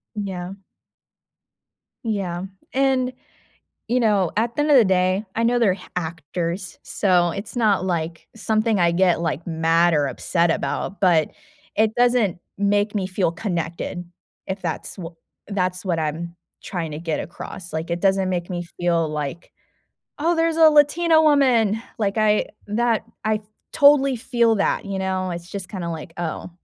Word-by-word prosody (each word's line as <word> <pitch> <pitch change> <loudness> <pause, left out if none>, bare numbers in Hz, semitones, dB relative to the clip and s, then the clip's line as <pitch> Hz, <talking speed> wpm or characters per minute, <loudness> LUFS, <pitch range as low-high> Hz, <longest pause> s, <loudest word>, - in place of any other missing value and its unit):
Yeah. 190 -3 -4 1.5
Yeah, 190 -5 -2 0.3
and 260 -1 +2 0.8
you 245 +2 +2
know, 205 -6 +2
at 235 +1 0
the - - +1
end 300 +1 +2
of 280 - +8
the 235 - +6
day, 185 +2 +2
I 230 - 0
know 245 +1 +3
they're 210 -6 +4
h 185 - -10 0.2
actors, 170 +2 -4
so 175 -4 +2
it's 205 +4 -7
not, 210 -5 +3
like, 165 -3 -3
something 220 -1 +1
I 170 -1 +4
get, 180 0 +3
like, 165 -1 -2
mad 165 +1 +2
or 145 -2 +2
upset 170 +5 0
about, 190 +3 -2
but 170 -5 +3 0.4
it 220 0 +2
doesn't 240 -7 +3 0.2
make 205 +1 +1
me 195 -2 0
feel 185 -2 0
connected 175 -1 -3 0.4
if 190 +1 -4
that's 165 -3 -4
wh 180 -4 -6 0.4
that's 185 -2 -1
what 175 -4 0
I'm 165 +3 -4 0.3
trying 170 -4 -4
to 150 - -5
get 165 -2 -2
across, 175 +1 -8
like 160 +2 -3
it 170 0 -1
doesn't 195 -1 +2
make 175 -2 -2
me 175 -1 -3 0.2
feel 170 -2 +1
like, 150 +2 -5 0.7
"Oh, 335 +3 +2
there's 330 0 +1
a 320 -1 +7
Latina 315 +2 +4
woman," 250 -8 +3 0.2
like 200 -2 0
I 215 -1 +3 0.2
that 230 +1 +1 0.2
I, 215 -1 +1 0.3
totally, 280 -2 +5
feel 235 -1 +2
that, 200 0 0
you 195 -1 -3
know, 190 -1 -1
it's 175 +1 -7
just 190 -2 -6
kinda 175 -4 -4
like, 165 +1 -7
"Oh," 175 +1 -4
190 Hz, 160 wpm, -22 LUFS, 170-225 Hz, 1.5 s, of